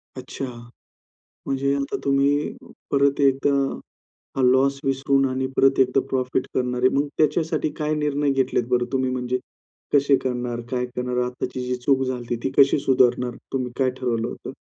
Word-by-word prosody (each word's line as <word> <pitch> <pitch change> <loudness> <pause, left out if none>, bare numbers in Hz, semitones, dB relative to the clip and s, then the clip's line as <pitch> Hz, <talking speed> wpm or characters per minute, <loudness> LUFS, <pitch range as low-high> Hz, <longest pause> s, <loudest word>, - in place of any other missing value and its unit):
अच्छा. 130 +1 -6 1.0
म्हणजे 140 +1 0
आता 140 0 -2
तुम्ही 140 +1 +1 0.4
परत 140 0 +2
एकदा 135 +1 +3 0.9
हा - - +2
लॉस 135 +2 +3
विसरून 135 0 +2
आणि 130 0 -1
परत 135 0 +4
एकदा 130 0 +4
प्रॉफिट 130 0 -1
करणार 125 -1 -1
आहे. 130 - +6
मग 140 +1 +1
त्याच्यासाठी 155 +1 +1
काय 155 0 -1
निर्णय 145 -1 0
घेतलेत 130 -2 +1
बरं 125 -1 +2
तुम्ही? 130 -1 +1
म्हणजे 125 0 -2 0.5
कसे 140 -1 +5
करणार? 125 -2 -2
काय 125 -1 0
करणार? 125 0 -2
आत्ताची 125 0 -4
जी 125 - 0
चूक 135 +2 +1
झाली 130 -1 -2
होती, 120 0 -2
ती 135 - -1
कशी 140 +1 +4
सुधारणार? 125 -2 +2 0.2
तुम्ही 125 -2 -2
काय 130 - +3
ठरवलं 120 -2 -1
होतं? - - -7
130 Hz, 160 wpm, -23 LUFS, 125-140 Hz, 1.0 s, आहे